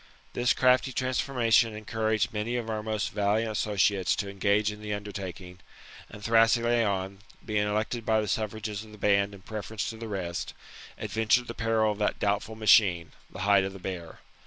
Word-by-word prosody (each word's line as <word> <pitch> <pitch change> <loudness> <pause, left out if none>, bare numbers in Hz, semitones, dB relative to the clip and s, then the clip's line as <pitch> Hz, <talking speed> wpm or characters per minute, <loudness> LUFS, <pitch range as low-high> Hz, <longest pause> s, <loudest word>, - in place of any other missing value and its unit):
This 120 0 +2
crafty 130 +1 +3
transformation 125 -3 +1
encouraged 110 +1 -1
many 110 +3 -2
of 115 -2 -3
our 110 -1 -2
most 110 -1 -2
valiant 105 +2 0
associates 100 -2 +1
to 100 -1 -4
engage 100 +2 +1
in 105 0 -10
the 105 -1 -3
undertaking; 95 -3 -7 0.5
and 105 - -11
Thrasyleon, 115 -4 +2 0.3
being 105 -1 0
elected 110 +3 -2
by 110 0 +2
the 105 - -2
suffrages 110 -1 -3
of 110 -1 -14
the - - -12
band 100 0 +2
in 95 - -16
preference 110 0 -5
to 110 - -10
the 115 0 -7
rest, 90 -5 -4 0.4
adventured 110 +2 +1
the 115 - -6
peril 110 -1 +1
of 105 - -6
that 105 - 0
doubtful 105 +2 -1
machine 100 -6 +4 0.2
[the 90 - -9
hide 100 0 +4
of 95 0 -4
the - - -9
bear. 90 -3 -7
105 Hz, 175 wpm, -28 LUFS, 100-110 Hz, 0.5 s, machine